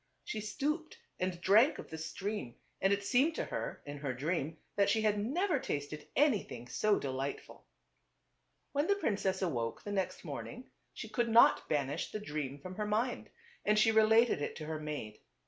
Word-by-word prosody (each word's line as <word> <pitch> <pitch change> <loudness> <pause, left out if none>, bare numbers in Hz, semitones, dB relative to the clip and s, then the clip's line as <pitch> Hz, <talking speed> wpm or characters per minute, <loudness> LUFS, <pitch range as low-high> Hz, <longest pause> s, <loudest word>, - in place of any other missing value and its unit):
She 215 - -4
stooped 300 +9 -2 0.2
and 185 -1 -1
drank 220 - +5
of - - -9
the 160 - -5
stream 165 - -4 0.3
and 195 - +3
it 200 0 +1
seemed 265 +9 +3
to - - -2
her, - - -4
in 145 0 -6
her 140 -3 -3
dream, 155 +2 -2 0.2
that 200 -1 +3
she 220 - +3
had 210 -1 +2
never 300 - +1
tasted 145 - -4
anything 215 - +1
so 200 - +2
delightful. 135 +1 -5 1.0
When 290 +3 +1
the 400 - +4
princess 195 - 0
awoke 120 -10 -2
the 205 - -5
next 195 -2 -2
morning - - -7 0.2
she - - -7
could 240 -2 0
not 230 +1 +6
banish 145 -1 -1
the 215 - -4
dream 150 -8 -4
from 185 +6 -9
her 210 -1 -1
mind, 225 +4 -1 0.3
and 210 0 +3
she 220 +1 +5
related 220 -3 +5
it - - -3
to 155 - -6
her 155 0 -3
maid. 150 -9 -5
200 Hz, 180 wpm, -33 LUFS, 150-225 Hz, 1.0 s, not